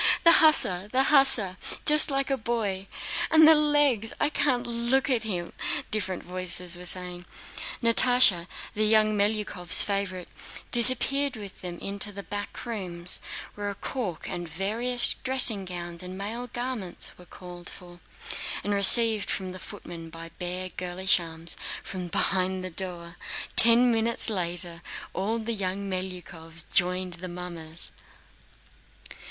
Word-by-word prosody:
The 335 Hz, -, +7 dB
hussar, 200 Hz, -, +3 dB
the 260 Hz, +1 st, +1 dB
hussar! 265 Hz, -10 st, +3 dB, 0.3 s
Just 300 Hz, +1 st, +7 dB
like 275 Hz, 0 st, -2 dB
a -, -, +1 dB
boy! 210 Hz, -5 st, -4 dB, 0.4 s
And 315 Hz, -1 st, +5 dB
the 320 Hz, -, +8 dB
legs!... 290 Hz, -7 st, +1 dB
I 295 Hz, -, 0 dB
can't 255 Hz, -5 st, -1 dB
look 240 Hz, +3 st, -1 dB
at 235 Hz, -3 st, -1 dB
him..." 175 Hz, -5 st, -5 dB, 0.4 s
different 190 Hz, -4 st, -3 dB
voices 180 Hz, -1 st, -4 dB
were 180 Hz, 0 st, -7 dB
saying. 180 Hz, -1 st, -2 dB, 0.6 s
Natásha, 230 Hz, -6 st, +5 dB, 0.3 s
the 215 Hz, -, -2 dB
young 215 Hz, 0 st, +2 dB
Melyukóvs' 205 Hz, -4 st, 0 dB
favorite, 195 Hz, -3 st, -4 dB, 0.4 s
disappeared 255 Hz, +3 st, +7 dB
with 205 Hz, -3 st, -11 dB
them 175 Hz, -1 st, -8 dB
into 200 Hz, +2 st, -2 dB
the 200 Hz, 0 st, -10 dB
back 205 Hz, +4 st, -8 dB
rooms 180 Hz, -7 st, -4 dB, 0.3 s
where 205 Hz, 0 st, -6 dB
a 200 Hz, -, -7 dB
cork 195 Hz, -7 st, -6 dB
and 175 Hz, -2 st, -7 dB
various 225 Hz, +9 st, 0 dB
dressing 245 Hz, -6 st, +4 dB
gowns 175 Hz, -1 st, -7 dB
and 185 Hz, +1 st, -9 dB
male 225 Hz, +5 st, -6 dB
garments 240 Hz, -7 st, -7 dB
were 180 Hz, -, -15 dB
called 175 Hz, -2 st, -10 dB
for 175 Hz, -1 st, -14 dB, 0.6 s
and 205 Hz, -, -3 dB
received 215 Hz, +2 st, +5 dB
from 185 Hz, -2 st, -3 dB
the 185 Hz, -, -10 dB
footman 165 Hz, -2 st, -11 dB
by 165 Hz, +1 st, -10 dB
bare 180 Hz, +1 st, -4 dB
girlish 185 Hz, +1 st, -1 dB
arms 165 Hz, 0 st, -7 dB, 0.3 s
from 185 Hz, -2 st, -7 dB
behind 185 Hz, +1 st, -1 dB
the 185 Hz, -, -7 dB
door. 175 Hz, -1 st, -6 dB, 0.4 s
Ten 235 Hz, +2 st, +5 dB
minutes 225 Hz, 0 st, +6 dB
later, 175 Hz, -2 st, 0 dB, 0.3 s
all 210 Hz, +5 st, -3 dB
the 230 Hz, +1 st, -4 dB
young 200 Hz, -1 st, -4 dB
Melyukóvs 175 Hz, -3 st, -7 dB
joined 180 Hz, 0 st, 0 dB
the 185 Hz, -, -7 dB
mummers. 175 Hz, -2 st, -5 dB
195 Hz, 140 wpm, -25 LUFS, 180-235 Hz, 0.6 s, the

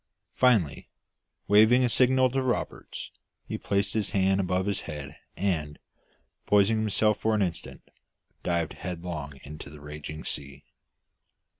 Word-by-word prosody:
Finally, 110 Hz, -, +2 dB, 0.6 s
waving 110 Hz, +5 st, +6 dB
a -, -, +4 dB
signal 130 Hz, +2 st, +4 dB
to 135 Hz, +2 st, -1 dB
Roberts, 130 Hz, -2 st, -3 dB, 0.3 s
he -, -, -4 dB
placed 100 Hz, 0 st, -1 dB
his 110 Hz, -3 st, 0 dB
hands 95 Hz, -1 st, +2 dB
above 95 Hz, 0 st, 0 dB
his 100 Hz, -2 st, -1 dB
head 75 Hz, -2 st, -6 dB, 0.2 s
and, 80 Hz, -6 st, -1 dB, 0.7 s
poising 105 Hz, +2 st, +4 dB
himself 105 Hz, 0 st, +2 dB
for 110 Hz, 0 st, +1 dB
an 105 Hz, -, +2 dB
instant, 85 Hz, -3 st, -5 dB, 0.6 s
dived 85 Hz, -2 st, -1 dB
headlong 85 Hz, -6 st, -6 dB
into 75 Hz, 0 st, -9 dB
the 75 Hz, 0 st, -12 dB
raging 75 Hz, +1 st, -8 dB
sea. 70 Hz, -1 st, -5 dB
95 Hz, 130 wpm, -27 LUFS, 75-110 Hz, 0.7 s, waving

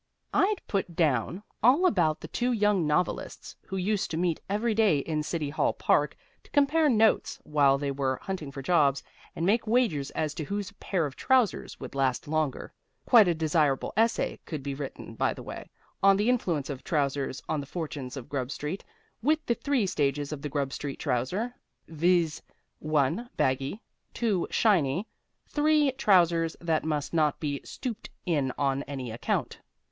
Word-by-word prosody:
I'd 405 Hz, +1 st, +2 dB
put 195 Hz, -5 st, -2 dB
down 155 Hz, -, +1 dB, 0.2 s
all 270 Hz, -, +5 dB
about 170 Hz, -, +2 dB
the -, -, -7 dB
two 250 Hz, +1 st, -1 dB
young 210 Hz, -7 st, +2 dB
novelists 150 Hz, +4 st, -2 dB
who 190 Hz, -, -4 dB
used 200 Hz, +2 st, 0 dB
to 160 Hz, -, -3 dB
meet 170 Hz, -2 st, 0 dB
every 215 Hz, +3 st, +1 dB
day 210 Hz, -8 st, +4 dB
in 155 Hz, +2 st, -1 dB
City 150 Hz, -1 st, -3 dB
Hall -, -, +1 dB
Park -, -, +1 dB, 0.2 s
to -, -, -22 dB
compare 295 Hz, +2 st, +3 dB
notes 220 Hz, -3 st, +3 dB
while 140 Hz, -2 st, +3 dB
they 140 Hz, 0 st, -2 dB
were 135 Hz, -1 st, -1 dB
hunting 180 Hz, -7 st, -4 dB
for 135 Hz, 0 st, -7 dB
jobs, 140 Hz, -4 st, +3 dB, 0.3 s
and 165 Hz, -, -2 dB
make 220 Hz, +4 st, +2 dB
wagers 215 Hz, -, +2 dB
as 155 Hz, -1 st, 0 dB
to 155 Hz, -, -4 dB
whose 200 Hz, +5 st, -4 dB
pair 180 Hz, -5 st, 0 dB
of 135 Hz, -3 st, -6 dB
trousers 255 Hz, -5 st, +1 dB
would 130 Hz, -, -8 dB
last 135 Hz, -1 st, 0 dB
longer. 155 Hz, -3 st, -2 dB, 0.3 s
(Quite 225 Hz, -6 st, +7 dB
a 175 Hz, -, +2 dB
desirable 155 Hz, -3 st, +1 dB
essay 225 Hz, +1 st, +1 dB
could 150 Hz, -4 st, -5 dB
he 140 Hz, -, -2 dB
written, 140 Hz, 0 st, -7 dB
by -, -, 0 dB
the -, -, -9 dB
way, -, -, -8 dB, 0.3 s
on 195 Hz, 0 st, +6 dB
the 210 Hz, +4 st, +2 dB
influence 170 Hz, -, 0 dB
of 135 Hz, -1 st, -7 dB
trousers 140 Hz, -4 st, -1 dB
on 155 Hz, -, -1 dB
the 140 Hz, -, -6 dB
fortunes 145 Hz, -5 st, -5 dB
of 130 Hz, -, -7 dB
Grub 135 Hz, -3 st, -3 dB
Street, 150 Hz, +6 st, -4 dB, 0.4 s
with 310 Hz, +6 st, +1 dB
the 235 Hz, -, +2 dB
three 265 Hz, -3 st, 0 dB
stages 145 Hz, -4 st, -1 dB
of 150 Hz, -2 st, -5 dB
the 150 Hz, -, -4 dB
Grub 140 Hz, -1 st, -2 dB
Street 140 Hz, -2 st, -5 dB
trouser, 160 Hz, -, -1 dB, 0.3 s
viz.: 165 Hz, 0 st, +1 dB, 0.4 s
1, 155 Hz, -, 0 dB
baggy; 135 Hz, +8 st, 0 dB, 0.4 s
2, 210 Hz, -7 st, 0 dB
shiny; 185 Hz, -, +2 dB, 0.4 s
3, 300 Hz, -1 st, +3 dB
trousers 170 Hz, -8 st, +3 dB
that 165 Hz, -2 st, 0 dB
must 150 Hz, -1 st, -2 dB
not 155 Hz, -3 st, +2 dB
be 145 Hz, -3 st, -2 dB
stooped 245 Hz, -5 st, -6 dB, 0.2 s
in 145 Hz, -7 st, +1 dB
on 140 Hz, -1 st, +1 dB
any 130 Hz, -4 st, -5 dB
account.) 115 Hz, -, -2 dB
160 Hz, 175 wpm, -28 LUFS, 140-210 Hz, 0.4 s, Quite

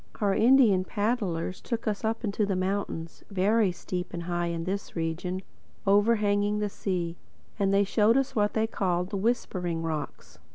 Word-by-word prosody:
Our 200 Hz, -2 st, +2 dB
Indian 225 Hz, -5 st, +5 dB
paddlers 200 Hz, -4 st, -1 dB
took 235 Hz, -2 st, -4 dB
us 210 Hz, -2 st, -1 dB
up 225 Hz, +2 st, -1 dB
into 210 Hz, 0 st, 0 dB
the 200 Hz, -2 st, 0 dB
mountains, 185 Hz, -3 st, -3 dB
very 200 Hz, +1 st, +2 dB
steep 180 Hz, +1 st, -5 dB
and 170 Hz, -, -4 dB
high 175 Hz, 0 st, -1 dB
in 170 Hz, -1 st, -3 dB
this 195 Hz, +3 st, -4 dB
region, 175 Hz, +3 st, -2 dB, 0.4 s
overhanging 205 Hz, 0 st, +3 dB
the 210 Hz, -1 st, -1 dB
sea. 175 Hz, -4 st, -3 dB, 0.4 s
And 195 Hz, -1 st, +2 dB
they 200 Hz, +1 st, +4 dB
showed 215 Hz, +4 st, +3 dB
us 270 Hz, 0 st, 0 dB
what 210 Hz, -1 st, +2 dB
they 220 Hz, 0 st, +2 dB
called 180 Hz, -4 st, -1 dB
the 200 Hz, -, -1 dB
Whispering 185 Hz, -6 st, -1 dB
Rocks. 155 Hz, -, -5 dB
195 Hz, 165 wpm, -28 LUFS, 180-210 Hz, 0.4 s, Indian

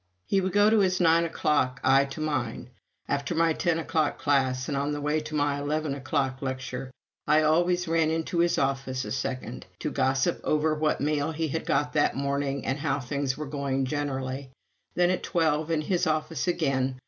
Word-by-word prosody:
He 195 Hz, -, +2 dB
would 190 Hz, 0 st, -1 dB
go 205 Hz, +1 st, +5 dB
to 220 Hz, -, +5 dB
his 185 Hz, -2 st, +2 dB
nine 170 Hz, -1 st, +4 dB
o'clock, 140 Hz, -5 st, 0 dB
I 135 Hz, +1 st, +5 dB
to 140 Hz, +3 st, -7 dB
mine. 125 Hz, -5 st, -3 dB, 0.4 s
After 140 Hz, +4 st, -1 dB
my 165 Hz, 0 st, +3 dB
ten 170 Hz, 0 st, 0 dB
o'clock 160 Hz, -2 st, 0 dB
class, 130 Hz, -3 st, +1 dB
and 145 Hz, -, -2 dB
on 140 Hz, +2 st, -1 dB
the 145 Hz, -, -3 dB
way 150 Hz, +2 st, 0 dB
to 155 Hz, 0 st, -6 dB
my 145 Hz, -1 st, +1 dB
eleven 150 Hz, 0 st, -1 dB
o'clock 130 Hz, -1 st, -2 dB
lecture, 130 Hz, -1 st, -4 dB, 0.4 s
I 155 Hz, +1 st, +4 dB
always 175 Hz, +3 st, +2 dB
ran 165 Hz, -1 st, +2 dB
in 160 Hz, 0 st, 0 dB
to 170 Hz, -, -2 dB
his 170 Hz, 0 st, +3 dB
office 135 Hz, -1 st, -1 dB
a -, -, -6 dB
second, 125 Hz, -2 st, -4 dB
to 150 Hz, -, -3 dB
gossip 135 Hz, -1 st, +1 dB
over 155 Hz, +1 st, +1 dB
what 155 Hz, 0 st, 0 dB
mail 150 Hz, +1 st, 0 dB
he 160 Hz, 0 st, -2 dB
had 160 Hz, +4 st, -3 dB
got 145 Hz, +1 st, +1 dB
that 145 Hz, -, +2 dB
morning 140 Hz, 0 st, -1 dB
and 135 Hz, +2 st, -1 dB
how 140 Hz, -2 st, 0 dB
things 135 Hz, 0 st, -2 dB
were 150 Hz, -, -4 dB
going 135 Hz, -2 st, -1 dB
generally. 135 Hz, -1 st, -3 dB, 0.5 s
Then, 175 Hz, 0 st, +3 dB
at 185 Hz, -, -1 dB
twelve, 160 Hz, -3 st, 0 dB
in 160 Hz, -2 st, +1 dB
his 175 Hz, +2 st, 0 dB
office 155 Hz, 0 st, -1 dB
again. 135 Hz, -6 st, 0 dB
145 Hz, 195 wpm, -27 LUFS, 135-160 Hz, 0.5 s, go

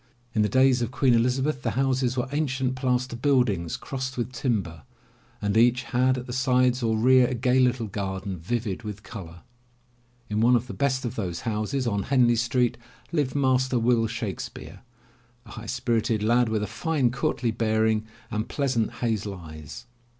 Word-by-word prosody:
In 110 Hz, -, +2 dB
the 105 Hz, -, +2 dB
days 130 Hz, -1 st, +4 dB
of 120 Hz, -, -1 dB
Queen 125 Hz, 0 st, +2 dB
Elizabeth 125 Hz, +4 st, +1 dB
the 115 Hz, -1 st, -2 dB
houses 130 Hz, -1 st, +1 dB
were 125 Hz, +1 st, 0 dB
ancient 135 Hz, -3 st, 0 dB
plaster 125 Hz, -1 st, -1 dB
buildings 120 Hz, -, +1 dB
crossed 130 Hz, -1 st, -5 dB
with 120 Hz, +1 st, -2 dB
timber 100 Hz, -, -2 dB, 0.6 s
and 105 Hz, 0 st, -1 dB
each 120 Hz, +2 st, +4 dB
had 130 Hz, +1 st, +1 dB
at 125 Hz, -, -5 dB
the 125 Hz, -, -6 dB
sides 130 Hz, -1 st, +2 dB
or 110 Hz, -2 st, +1 dB
rear 125 Hz, +2 st, +5 dB
a 125 Hz, -, -2 dB
gay 125 Hz, +2 st, +2 dB
little 125 Hz, -2 st, +2 dB
garden 95 Hz, -2 st, -4 dB
vivid 110 Hz, +2 st, -3 dB
with 105 Hz, -2 st, -7 dB
color. 85 Hz, -6 st, -9 dB, 0.9 s
In 105 Hz, +1 st, -1 dB
one 120 Hz, +2 st, +5 dB
of 120 Hz, 0 st, +1 dB
the 125 Hz, -, -7 dB
best 130 Hz, -2 st, 0 dB
of 120 Hz, -, -3 dB
those 90 Hz, -5 st, -4 dB
houses 115 Hz, +4 st, -2 dB
on 100 Hz, -4 st, 0 dB
Henley 125 Hz, -3 st, +4 dB
Street, 120 Hz, +1 st, +1 dB, 0.3 s
lived 145 Hz, -6 st, 0 dB
Master 130 Hz, -2 st, +2 dB
Will 115 Hz, -1 st, +2 dB
Shakespeare, 110 Hz, -5 st, -6 dB, 0.7 s
a 105 Hz, -, -13 dB
high 115 Hz, 0 st, -8 dB
spirited 115 Hz, -3 st, 0 dB
lad, 120 Hz, +1 st, +3 dB
with 110 Hz, -1 st, 0 dB
a -, -, 0 dB
fine, 125 Hz, +3 st, 0 dB
courtly 120 Hz, -1 st, -1 dB
bearing 110 Hz, -1 st, +1 dB, 0.2 s
and 105 Hz, +1 st, -2 dB
pleasant 130 Hz, -6 st, 0 dB
hazel 105 Hz, -4 st, -1 dB
eyes. 80 Hz, -4 st, -10 dB
120 Hz, 170 wpm, -26 LUFS, 110-130 Hz, 0.9 s, rear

